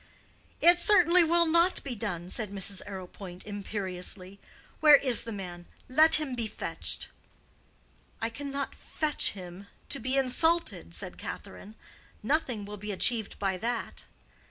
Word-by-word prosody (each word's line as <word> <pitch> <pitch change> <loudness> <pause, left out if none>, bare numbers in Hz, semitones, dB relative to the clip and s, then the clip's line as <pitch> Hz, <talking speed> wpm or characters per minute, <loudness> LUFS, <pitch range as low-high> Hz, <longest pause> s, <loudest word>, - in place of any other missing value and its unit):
"It 345 +1 +6
certainly 360 -2 +5
will 340 +1 +3
not 335 +3 +2
be 275 - -5
done," 185 -6 -4
said 215 -4 -2
Mrs. 195 0 -2
Arrowpoint, 185 -1 -8
imperiously. 195 -2 -4 0.4
"Where 300 -2 +8
is 260 -4 +6
the 230 - -7
man? 175 -4 -8 0.2
Let 310 +5 +5
him 295 -4 -1
be 235 -3 -2
fetched." - - -1 1.1
"I 225 +1 -2
cannot 280 +2 -5
fetch 310 -2 0
him 185 0 -10 0.2
to - - 0
be 255 +3 -1
insulted," 320 +6 +1
said - - -7
Catherine. 210 +2 -8 0.5
"Nothing 250 -5 0
will 210 +1 -8
be 210 +1 -6
achieved 220 +2 +1
by 195 -2 -1
that." 235 +4 -4
225 Hz, 135 wpm, -29 LUFS, 195-295 Hz, 1.1 s, Where